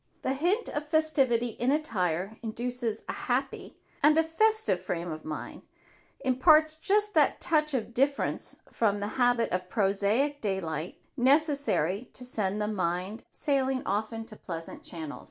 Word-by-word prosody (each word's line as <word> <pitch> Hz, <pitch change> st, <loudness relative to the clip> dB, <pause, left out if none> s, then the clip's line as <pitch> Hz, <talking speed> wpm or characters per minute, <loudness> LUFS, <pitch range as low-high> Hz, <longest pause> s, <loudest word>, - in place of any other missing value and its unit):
The 265 Hz, -, +1 dB
hint 355 Hz, -, +1 dB
of 295 Hz, +1 st, -4 dB
festivity 275 Hz, -7 st, +2 dB
in 240 Hz, +3 st, -2 dB
attire 200 Hz, -, -1 dB
induces 235 Hz, 0 st, -3 dB
a -, -, -3 dB
happy -, -, -3 dB, 0.2 s
and 300 Hz, +1 st, +5 dB
a 325 Hz, -, +5 dB
festive 435 Hz, +7 st, +1 dB
frame 170 Hz, 0 st, -3 dB
of 155 Hz, 0 st, -7 dB
mind, 155 Hz, -1 st, -6 dB, 0.6 s
imparts 305 Hz, +4 st, +5 dB
just 410 Hz, +6 st, +1 dB
that -, -, +4 dB
touch 305 Hz, -4 st, +2 dB
of 235 Hz, -1 st, -3 dB
difference 275 Hz, +4 st, 0 dB
from 205 Hz, -3 st, +1 dB
the 205 Hz, +1 st, -3 dB
habit 245 Hz, -1 st, +3 dB
of 180 Hz, 0 st, -2 dB
prosaic 210 Hz, +9 st, +1 dB
daylight 175 Hz, -5 st, -3 dB, 0.2 s
necessary 270 Hz, -, +2 dB
to 250 Hz, -, -9 dB
send 210 Hz, -4 st, -2 dB
the 210 Hz, -, 0 dB
mind 185 Hz, +2 st, -2 dB
sailing 270 Hz, -3 st, 0 dB
off 210 Hz, +3 st, -1 dB
into 225 Hz, -1 st, -7 dB
pleasant 165 Hz, -5 st, -7 dB
channels. 160 Hz, -4 st, -7 dB
240 Hz, 145 wpm, -29 LUFS, 200-295 Hz, 0.6 s, and